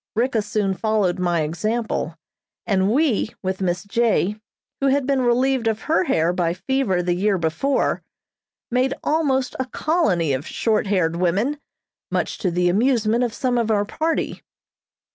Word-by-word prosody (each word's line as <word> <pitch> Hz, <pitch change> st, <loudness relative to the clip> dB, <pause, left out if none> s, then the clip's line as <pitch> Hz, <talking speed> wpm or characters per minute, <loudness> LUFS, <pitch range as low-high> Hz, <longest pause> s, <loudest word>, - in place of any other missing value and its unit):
Ricka 235 Hz, 0 st, +1 dB
soon 205 Hz, -1 st, -1 dB
followed 195 Hz, -2 st, 0 dB
my 175 Hz, -2 st, +1 dB
example, 175 Hz, +1 st, -2 dB, 0.5 s
and 195 Hz, -1 st, +2 dB
we, 250 Hz, -5 st, +1 dB
with 190 Hz, 0 st, -2 dB
Miss 180 Hz, -1 st, -1 dB
J., 210 Hz, -2 st, +1 dB, 0.4 s
who 275 Hz, -, +1 dB
had 275 Hz, 0 st, +2 dB
been 270 Hz, -1 st, +1 dB
relieved 250 Hz, 0 st, +2 dB
of 220 Hz, -1 st, -1 dB
her 325 Hz, +3 st, +2 dB
hair 170 Hz, -, +2 dB
by 175 Hz, -1 st, 0 dB
fever 195 Hz, -4 st, 0 dB
the 175 Hz, 0 st, +1 dB
year 195 Hz, +2 st, +1 dB
before, 170 Hz, -, 0 dB, 0.7 s
made 255 Hz, +2 st, +1 dB
almost 280 Hz, -4 st, +1 dB
a 260 Hz, -, 0 dB
colony 205 Hz, -, +1 dB
of 135 Hz, +4 st, -3 dB
short 220 Hz, -2 st, 0 dB
haired 175 Hz, -4 st, +1 dB
women, 200 Hz, +12 st, 0 dB, 0.5 s
much -, -, -2 dB
to 185 Hz, -, 0 dB
the 180 Hz, +1 st, +1 dB
amusement 230 Hz, +3 st, +2 dB
of 240 Hz, -, 0 dB
some 250 Hz, -2 st, 0 dB
of 225 Hz, -1 st, 0 dB
our 205 Hz, -2 st, +2 dB
party. 320 Hz, +9 st, -2 dB
215 Hz, 155 wpm, -22 LUFS, 180-255 Hz, 0.7 s, and